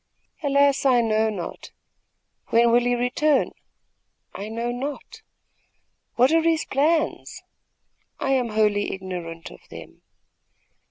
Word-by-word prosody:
"Alas, 280 -1 +2
I 255 -3 +4
know 220 -1 +1
not." 195 -5 -7 0.8
"When 235 +1 +4
will 240 - +5
he 245 0 +2
return?" 265 +4 +1 0.8
"I 205 +2 -6
know 230 +2 -3
not." 285 - -6 0.9
"What 255 +4 +4
are 330 0 +4
his 325 -1 +1
plans?" 310 +4 -1 0.8
"I 270 - -1
am 255 -3 +1
wholly 210 -1 +1
ignorant 175 -3 -7
of - - -13
them." - - -12
245 Hz, 115 wpm, -23 LUFS, 215-280 Hz, 0.9 s, will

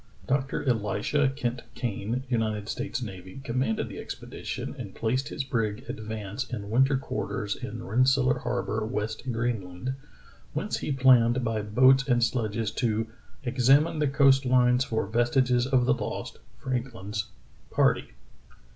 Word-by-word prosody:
Doc 135 0 +1
tor - - -2
Elisha 120 +4 +1
Kent 120 -3 -2
Kane, 115 +2 -2
United 110 -4 -1
States 130 +2 -3
Navy, 95 0 -8
commanded 120 -3 0
the - - -8
expedition, - - -6
and - - -7
placed 130 +5 0
his 135 - -3
brig 115 -2 -2
Advance 110 +2 -5
in 105 -4 -5
win 130 +4 +5
ter 135 0 +1
quarters 105 -5 -3
in 115 +2 -6
Rensselaer 130 +3 +3
Harbor, 120 -3 -2
West 110 -1 -3
Greenland, 115 -1 -2 0.6
whence - - -2
he - - -3
planned 125 -2 +5
by 115 -2 0
boats 130 +6 +4
and 120 -2 +3
sledges 110 -3 0
to 115 -3 0 0.4
"exam 135 +4 +4
ine 165 -1 -4
the 150 - +2
coast 135 0 +5
lines 125 0 +4
for 110 -4 -1
vestiges 120 +3 +2
of 130 -2 +3
the - - +4
lost - - -5 0.2
(Frankhn's) 115 -5 -3 0.4
party." - - +2
120 Hz, 145 wpm, -27 LUFS, 110-130 Hz, 0.6 s, win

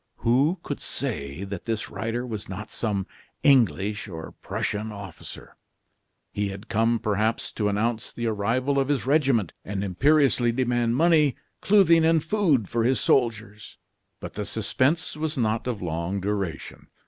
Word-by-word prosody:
Who 140 +10 +3
could - - -4
say 70 +6 -4
that 100 -2 -6
this 115 -2 -3
rider 115 +5 -3
was 110 -4 -6
not 105 +3 -7
some 100 -4 -2 0.4
English 110 -6 +3
or 80 -4 -7
Prussian 110 +1 -3
officer? 100 -2 -10 0.8
He 105 0 -1
had 100 +3 -8
come, 115 +2 +2
perhaps, 110 0 -1
to 105 -2 -1
announce 110 +3 -1
the 120 - -4
arrival 115 +6 0
of 135 - +1
his 140 -4 0
regiment, 130 - +2
and 100 0 -3
imperiously 130 - +3
demand 120 -2 +1
money, 155 -2 +4 0.3
clothing, 185 -5 +5
and 160 -1 +3
food 165 - +2
for 115 +3 0
his 130 +2 +2
soldiers. 110 -4 0 0.4
But - - -8
the 105 - -3
suspense 120 - 0
was 155 0 -3
not 115 -1 0
of 110 -7 -3
long 85 +3 -2
duration. 95 -6 -4
115 Hz, 150 wpm, -25 LUFS, 100-135 Hz, 0.8 s, clothing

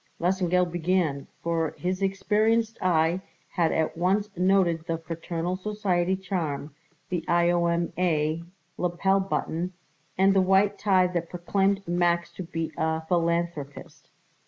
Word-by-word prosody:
Lesengeld 180 0 +1
began, 170 -4 0 0.2
for 165 -1 -1
his 185 +2 -2
experienced 215 +3 +1
eye 170 0 +2 0.3
had 170 -3 +1
at 160 -1 0
once 195 +4 0
noted 180 -3 +2
the 165 -1 -1
fraternal 165 +2 -4
society 190 -2 0
charm, 165 -7 -3 0.4
the 175 -3 -2
I.O.M.A. 170 -2 +1 0.4
lapel 185 +2 +2
button, 180 -2 -2 0.4
and 195 +1 +5
the 195 - +4
white 195 +2 +3
tie 190 -3 +4
that 175 -2 -2
proclaimed 195 +2 0
Max 175 0 +1
to - - -8
be 165 -2 -4
a 160 0 0
philanthropist. 170 -4 -2
175 Hz, 120 wpm, -26 LUFS, 165-190 Hz, 0.4 s, and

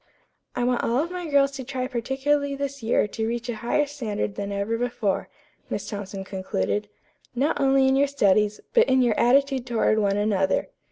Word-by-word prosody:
"I 245 - -1
want 245 0 +1
all 250 +7 +1
my 360 -1 -5
girls 280 -1 +4
to 270 -1 -6
try 255 0 -3
particularly 275 +4 -1
this 280 -1 -4
year 225 -1 +2
to 220 +2 -3
reach 240 +1 -3
a 230 - -3
higher 240 +6 +1
standard 230 -8 -3
than 200 0 -4
ever 200 +3 -1
before," 230 -4 -1 0.4
Miss - - -4
Thompson 200 -2 -5
concluded, 190 - -2 0.5
"not 285 +3 0
only 270 -1 +4
in 265 - +3
your 280 +1 +3
studies, 210 -6 +2
but 470 -2 +5
in 260 0 +4
your 240 -3 +3
attitude 265 0 +3
toward 220 -2 +2
one 200 -1 +1
another. 200 - +1
240 Hz, 180 wpm, -25 LUFS, 210-275 Hz, 0.5 s, but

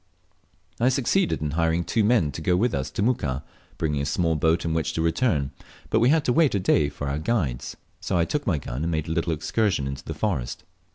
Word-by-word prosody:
I 120 +2 +4
succeeded 135 - +1
in 75 - -1
hiring 80 +2 +1
two 110 +5 +1
men 105 -9 +3
to 75 - -7
go 90 +3 +2
with 115 +4 +1
us 65 - -2
to - - -2
Muka, 75 - 0 0.3
bringing 75 -3 -1
a - - -1
small 80 +2 +1
boat 80 +3 +1
in 80 - 0
which 80 -1 -1
to 80 - -1
return; 80 - +1 0.4
but 110 - +4
we 120 +3 +4
had 155 0 +3
to 125 - +2
wait 155 -6 +3
a - - +2
day 75 -5 +2
for 70 - -6
our 70 +2 -1
guides, 80 - -2 0.2
so 95 - -1
I 85 - +3
took 145 - -3
my 90 -6 +2
gun 65 -1 -5
and 85 +1 -1
made 80 -2 -1
a - - -3
little 85 +1 0
excursion 80 +1 0
info 70 +1 -4
the - - -4
forest. 65 - -2
80 Hz, 235 wpm, -25 LUFS, 75-110 Hz, 0.4 s, I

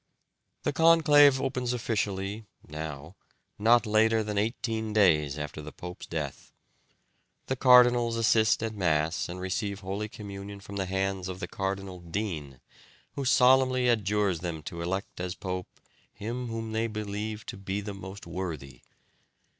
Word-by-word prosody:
The - - 0
conclave 150 -4 +6
opens 125 -2 -1
officially 105 -2 -2 0.2
(now) 75 +2 -7 0.4
not 115 +3 +5
later 110 +1 +3
than 105 0 -4
eighteen 110 0 -2
days 75 -9 +3
after 75 0 -5
the 75 +1 -8
pope's 90 +2 -9
death. 75 -4 -5 0.9
The 130 - -1
cardinals 125 -2 +6
assist 110 -1 +3
at 110 -1 -2
Mass 80 -5 0
and 90 +1 -6
receive 100 +2 -3
holy 100 +3 -4
communion 100 -1 -8
from 100 0 -8
the 95 -1 -1
hands 95 0 -1
of 95 0 -6
the 90 - -4
Cardinal 95 -1 -4
Dean, 85 - -5 0.5
who 140 - -4
solemnly 130 0 +4
adjures 105 -5 +1
them 80 -3 -5
to 85 +2 -6
elect 95 +3 -3
as 90 0 -3
pope 90 -1 -4 0.4
him 120 +4 -5
whom 115 -1 -4
they 110 +1 0
believe 105 0 -4
to - - -6
be 95 +1 -3
the 105 0 -5
most 95 0 -9
worthy. 80 -8 -6
100 Hz, 145 wpm, -28 LUFS, 90-115 Hz, 0.9 s, conclave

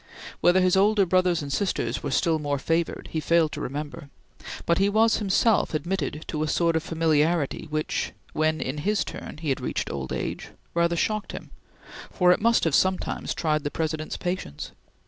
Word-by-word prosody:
Whether 180 +1 +4
his 185 0 +3
older 200 +1 +4
brothers 180 -2 +2
and 140 -1 -4
sisters 135 - -1
were 145 - -3
still 160 +4 +1
more 145 -1 -1
favored 165 +4 -1
he 160 - -1
failed 160 0 +2
to - - -5
remember, 145 +1 -5 0.6
but 170 - +2
he 195 +1 +3
was 220 +2 +3
himself 205 -2 +2
admitted 155 -3 -2
to 155 - -2
a 155 - 0
sort 165 +1 +1
of 160 - +2
familiarity 160 -1 +1
which, 155 0 -2 0.2
when 155 0 +1
in 135 +3 -3
his 205 +6 +1
turn - - -8
he 155 -1 -4
had 135 - 0
reached - - -2
old 65 -2 -5
age, - - -3 0.3
rather 170 0 +2
shocked 215 +5 -1
him, - - -8 0.6
for 180 -2 +3
it 180 - +2
must 230 +1 +3
have 165 - +1
sometimes 185 +4 0
tried 155 -2 0
the 145 - -1
President's 155 0 -3
patience. 175 - -4
165 Hz, 185 wpm, -25 LUFS, 150-185 Hz, 0.6 s, Whether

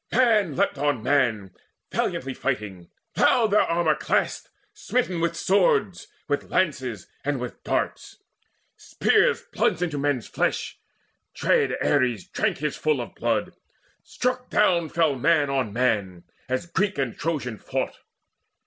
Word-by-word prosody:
Man 215 - +3
leapt - - 0
on 145 -6 0
man 120 -8 +1 0.4
Valiantly 135 0 -1
fighting; 105 -10 -4 0.3
loud 225 -4 +3
their 210 - +5
armour 165 -2 +2
clashed 150 - -1 0.2
Smitten 185 -9 -1
with 170 0 0
swords, 420 - +2 0.2
with 145 -1 -2
lances, 130 - -1 0.2
and 145 -2 -1
with 125 0 -7
darts. - - -2 0.6
Spears - - +2
plunged 175 - +1
into 155 -5 -2
men's 140 -4 0
flesh: - - -2 0.6
dread - - +2
Ares 125 -8 +1
drank - - -1
His 150 0 -2
fill 155 -3 0
of 120 - -6
blood: 115 -3 -1 0.5
struck 250 0 -3
down 175 -6 +2
fell 160 -3 +2
man 145 +2 +2
on 130 -6 0
man, 100 -7 0 0.3
As 130 +5 -1
Greek 190 +3 -1
and 135 -4 -1
Trojan 140 -9 -3
fought. - - -3
145 Hz, 130 wpm, -25 LUFS, 125-170 Hz, 0.6 s, their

